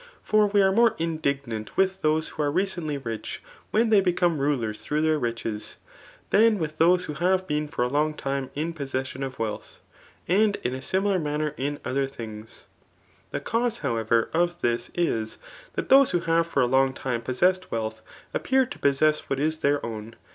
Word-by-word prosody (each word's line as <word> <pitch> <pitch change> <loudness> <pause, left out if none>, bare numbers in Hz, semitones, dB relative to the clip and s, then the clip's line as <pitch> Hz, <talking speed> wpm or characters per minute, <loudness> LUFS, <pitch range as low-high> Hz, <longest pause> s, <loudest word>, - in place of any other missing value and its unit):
For 215 -1 +3
we. 200 0 +3
are 190 - +4
more 230 +3 +4
indignant 140 -9 -3
with 190 0 +2
thoae 155 +1 +2
ivho - - -13
are 145 -1 +1
recently 175 -4 -1
rich 115 -5 -5 0.3
^en 225 +1 +2
they 205 -2 +6
become 175 -3 +1
rulers 125 -7 -1
through 150 +1 0
their 155 -1 +2
riches, 115 -3 -4 0.5
than 220 +1 +5
with 155 -3 -4
those 180 +2 +4
who 155 - -5
have 185 +4 +1
been 150 -2 -1
for. 135 - -2
a - - +1
long 150 +3 0
time 135 -2 -3
in 160 +3 -2
possession 135 -3 -4
of 135 -1 -4
wealth; 110 -2 -5 0.5
and 205 +3 +3
in 125 - -1
a 130 - -5
similar 190 +4 +1
manner 150 -1 -2
in 145 +2 -3
other 135 +1 0
dmigs. 110 -4 -9 0.7
The - - -4
cause,, 235 0 -1
howotrer, 115 -3 +1
x>f 175 +1 +1
this 120 0 0
is, 115 -11 -1 0.4
that - - -3
those 275 0 +7
who 175 -1 0
have 165 0 +2
for 165 - +1
a - - +4
long 130 +1 +3
time 125 -3 -2
possessed 180 +10 +1
wealth, 110 -1 -3 0.3
appear 265 0 +2
to 250 - -10
possess 150 +2 +2
what 135 - 0
.s 155 +2 0
their 145 -1 +1
own 115 0 -7
150 Hz, 185 wpm, -26 LUFS, 130-180 Hz, 0.7 s, those